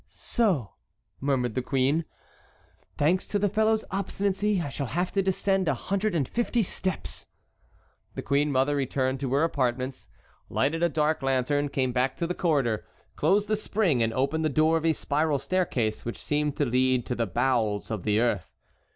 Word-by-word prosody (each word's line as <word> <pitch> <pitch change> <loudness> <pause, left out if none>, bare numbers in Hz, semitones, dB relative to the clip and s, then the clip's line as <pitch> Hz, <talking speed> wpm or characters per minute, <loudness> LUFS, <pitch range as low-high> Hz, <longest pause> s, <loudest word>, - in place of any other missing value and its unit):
"So," 185 - 0 0.5
murmured 130 -4 0
the 130 - -1
queen, 135 +5 +1 0.9
"thanks 170 +6 +2
to 205 - 0
the 205 0 +2
fellow's 220 +2 +2
obstinacy 200 +1 0
I 170 - -3
shall 140 0 -4
have 175 +5 -1
to 195 - +1
descend 190 0 +1
a 145 - +2
hundred 200 - -1
and 140 -6 +1
fifty 240 -1 0
steps." 185 0 -3 0.9
The - - -4
queen 145 +1 +1
mother 135 +2 +2
returned 130 -1 0
to 135 -2 -3
her 145 - +3
apartments, 130 -4 -1 0.4
lighted 160 +5 0
a 170 - +3
dark 155 0 +1
lantern, 135 +2 +1
came 130 -2 0
back 125 +2 0
to 170 - -1
the 175 - -2
corridor, 140 -12 +1 0.3
closed 200 +7 +2
the 215 - +2
spring, 200 - +1
and 115 0 +2
opened 140 +7 0
the 155 - +2
door 155 +3 +3
of 165 0 +1
a 160 - +4
spiral 150 0 0
staircase 135 -9 -1
which 120 - -4
seemed 150 -1 -1
to 145 - +2
lead 130 0 +2
to - - -2
the 115 -2 -1
bowels 110 0 0
of 110 -4 -2
the 105 +3 +1
earth. 115 -7 -1
145 Hz, 175 wpm, -27 LUFS, 130-180 Hz, 0.9 s, a